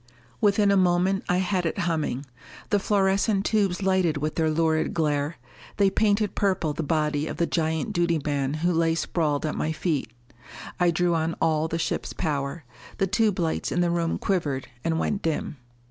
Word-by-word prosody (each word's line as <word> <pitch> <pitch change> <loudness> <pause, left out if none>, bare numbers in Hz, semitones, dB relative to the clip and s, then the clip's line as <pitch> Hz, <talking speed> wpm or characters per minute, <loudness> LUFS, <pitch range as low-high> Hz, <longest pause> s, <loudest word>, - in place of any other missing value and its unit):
Within 205 -1 +4
a 200 - +4
moment 185 +1 +2
I 180 - +3
had 185 0 0
it - - -3
humming. 155 -5 -1 0.5
The 205 - +4
fluorescent 195 0 +1
tubes 200 -3 +1
lighted 185 -5 +2
with 150 +2 -2
their 160 -1 +1
lurid 160 0 +1
glare; 150 -1 0 0.4
they 200 -2 +4
painted 210 0 +1
purple 185 -6 0
the 165 - -3
body 150 -1 0
of - - -5
the 170 - +2
giant 160 -3 -1
duty 170 -2 +1
man 140 -1 -1
who 180 - +3
lay 165 0 +2
sprawled 155 -2 -1
at 155 - -1
my 155 - -1
feet. 155 -6 -1 0.7
I 175 -1 +4
drew 175 +1 +1
on 165 0 0
all 160 -1 +1
the 165 - -2
ship's 165 - -2
power. 145 0 -2 0.3
The 195 - +2
tube 210 +1 +1
lights 165 -2 -1
in 175 - +1
the 175 -1 +2
room 170 -1 0
quivered 150 -9 -1
and 165 -1 0
went 200 +4 -1
dim. 160 -2 -2
165 Hz, 180 wpm, -25 LUFS, 155-190 Hz, 0.7 s, Within